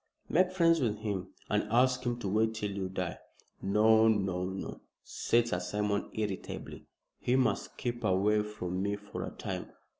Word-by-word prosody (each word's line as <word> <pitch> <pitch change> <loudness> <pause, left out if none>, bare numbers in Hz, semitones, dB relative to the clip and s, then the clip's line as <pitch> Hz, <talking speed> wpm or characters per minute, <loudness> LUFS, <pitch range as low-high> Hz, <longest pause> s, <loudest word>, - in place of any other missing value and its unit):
"Make 180 +2 +3
friends 165 -3 +4
with 110 -4 +1
him, 100 -4 -3 0.2
and - - +1
ask 125 +1 +3
him 120 -1 0
to 100 - -2
wait 110 +3 +2
till 105 -2 -2
you 95 -1 -3
die." 90 -2 -3 0.4
"No, 110 +3 +5
no, 95 -4 +1
no!" 95 +1 -5 0.2
said 120 0 +1
Sir 90 -6 0
Simon, 105 +2 -1
irritably. 105 -3 -4 0.3
"He 125 - +1
must 125 -6 +1
keep 120 -1 -3
away 105 +2 +3
from 95 -4 -4
me 100 +1 0
for 105 0 -6
a - - -4
time. - - -5
105 Hz, 170 wpm, -31 LUFS, 95-120 Hz, 0.4 s, No